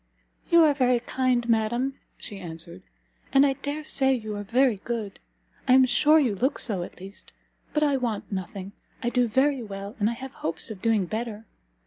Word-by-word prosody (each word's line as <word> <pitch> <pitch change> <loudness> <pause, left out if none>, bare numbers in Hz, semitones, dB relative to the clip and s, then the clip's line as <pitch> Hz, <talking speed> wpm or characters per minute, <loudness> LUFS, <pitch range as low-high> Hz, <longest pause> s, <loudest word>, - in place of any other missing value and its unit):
"You 340 -2 +7
are 300 -2 +5
very 250 -3 +2
kind, 245 -1 0
madam," 240 +4 0 0.2
she 205 - -7
answered, 170 0 -5 0.5
"and 275 +1 +6
I 275 - +3
dare 285 +3 -5
say 270 -3 +1
you 215 -3 -5
are 205 - -4
very 240 +2 +2
good; 215 -1 -5 0.5
I 255 - +6
am 260 0 +7
sure 305 +4 +5
you 265 -9 +3
look 260 +9 0
so, 200 -7 -2
at 175 - -8
least. 195 +2 -12 0.4
But 300 - +1
I 285 -2 +3
want 230 -6 -3
nothing; 190 0 -5 0.3
I 240 - +1
do 245 -1 +2
very 265 +4 +2
well, 200 -1 -7
and 210 +1 +2
I - - -2
have 265 +3 -8
hopes 165 +7 -4
of 200 -4 -8
doing 220 -4 +2
better. 220 +2 -4
235 Hz, 190 wpm, -26 LUFS, 205-265 Hz, 0.5 s, You